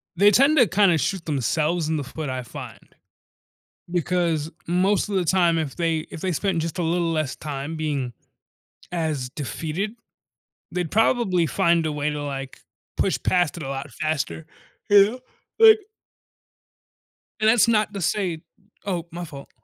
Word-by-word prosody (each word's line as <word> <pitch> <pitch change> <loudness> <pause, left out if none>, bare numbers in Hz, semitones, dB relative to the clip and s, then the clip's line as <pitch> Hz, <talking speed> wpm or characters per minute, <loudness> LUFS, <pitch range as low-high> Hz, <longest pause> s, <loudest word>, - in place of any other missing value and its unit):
they 200 +4 +6
tend 275 +8 +4
to 245 -5 +6
kinda 190 -2 +4
shoot 170 +5 -2
themselves 155 +3 0
in 160 - 0
the 145 - -2
foot, 150 +2 -6
I 130 -1 -3
find. 115 - -9 1.1
Because 170 -3 0 0.2
most 185 +4 +2
of 200 - -2
the 185 -2 +1
time, 170 -1 +3
if 155 -4 -3
they 165 -2 0
if 160 - -8
they 185 - -1
spent 180 0 0
just 165 +1 -4
a - - +1
little 170 0 0
less 155 -4 -1
time 145 +1 -5
being 145 -6 -2 0.8
as 155 -7 -2
defeated, 155 - -4 0.8
they'd 175 -3 -3
probably 220 -6 +2
find 170 0 +2
a 155 - -1
way 150 0 -1
to, 150 -1 -4
like, 135 -2 -6 0.4
push - - +1
past 175 -4 +1
it 170 - -6
a 135 - -5
lot 135 +1 -5
faster, 155 0 -2 0.4
you 200 -1 +8
know, 250 +2 -9 0.4
like 445 -1 +8 1.6
and 215 0 +4
that's 235 0 +5
not 215 -2 +2
to 200 - -4
say 175 -2 -1 0.4
Oh, 180 -4 -2
my 175 +1 -5
fault. 140 -3 -11
165 Hz, 160 wpm, -24 LUFS, 150-190 Hz, 1.6 s, you